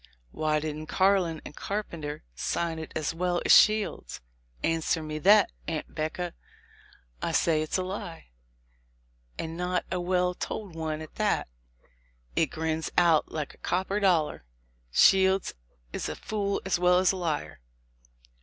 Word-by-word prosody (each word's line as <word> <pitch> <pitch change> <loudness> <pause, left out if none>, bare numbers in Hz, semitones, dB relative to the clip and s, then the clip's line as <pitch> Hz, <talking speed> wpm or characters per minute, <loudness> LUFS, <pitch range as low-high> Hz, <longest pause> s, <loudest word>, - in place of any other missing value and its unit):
Why 155 -1 0
didn't 155 0 -5
Carlin 185 -4 +2
and 150 - -9
Carpenter 170 -8 -4
sign 165 - -2
it 160 - -7
as 155 0 -1
well 175 +1 0
as - - +4
Shields? 215 -1 +4 0.4
Answer 165 0 0
me 155 0 -4
that, 200 +4 +6 0.2
Aunt 160 -2 -4
'Becca. 165 +3 -3 0.9
I - - -1
say 160 -2 +2
it's 155 - -1
a 185 - -1
lie, 185 - -6 1.1
and 160 0 -4
not 180 +1 -1
a 180 -1 -1
well 180 0 +1
told 200 +1 -5
one 155 -1 -3
at 155 - -12
that. - - 0 0.9
It 160 - +3
grins 160 +1 -2
out 170 -3 +4
like 155 -2 -4
a - - -22
copper 190 +3 -1
dollar. 170 - +2 0.5
Shields 190 - +4 0.4
is - - -3
a 75 - -4
fool 200 - -2
as 185 -2 +1
well 180 0 +5
as 185 0 +4
a 190 - -4
liar. 150 - -3
170 Hz, 145 wpm, -28 LUFS, 155-185 Hz, 1.1 s, that